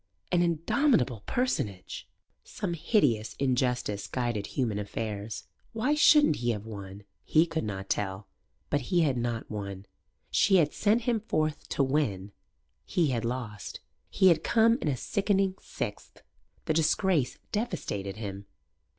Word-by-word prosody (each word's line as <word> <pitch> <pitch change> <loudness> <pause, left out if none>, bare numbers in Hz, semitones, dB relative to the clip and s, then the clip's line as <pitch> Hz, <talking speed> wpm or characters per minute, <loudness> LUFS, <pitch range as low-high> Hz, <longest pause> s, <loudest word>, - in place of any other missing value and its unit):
An 175 - +3
indomitable 165 - +2
personage. 110 - -2 0.3
Some 195 -5 -4
hideous 150 - +1
injustice 125 -6 0
guided 120 -5 -2
human 115 -6 -1
affairs. 105 +1 -4 0.3
Why 240 +6 +1
shouldn't 300 - +6
he 120 0 -1
have 105 -2 -2
won? 100 -2 -8 0.2
He 160 +2 +4
could 165 -1 -3
not 95 -2 -4
tell. 95 0 -2 0.4
But 145 - +2
he 175 -2 +3
had 145 -5 +2
not 120 -2 -3
won. 100 -2 -5 0.5
She 195 - +4
had 155 -5 +4
sent 215 +3 +2
him 235 -1 +1
forth 155 -7 -2
to 140 - +1
win. 115 -9 0 0.5
He 165 -4 +1
had 115 -3 -1
lost. 115 -5 -4 0.3
He 190 - +5
had 165 -2 +3
come 230 +2 +4
in - - -1
a 140 -3 +1
sickening 195 - +1
sixth. - - -6 0.4
The 160 - +1
disgrace 160 -2 +2
devastated 130 - -3
him. 100 -2 -6
130 Hz, 140 wpm, -29 LUFS, -, 0.5 s, shouldn't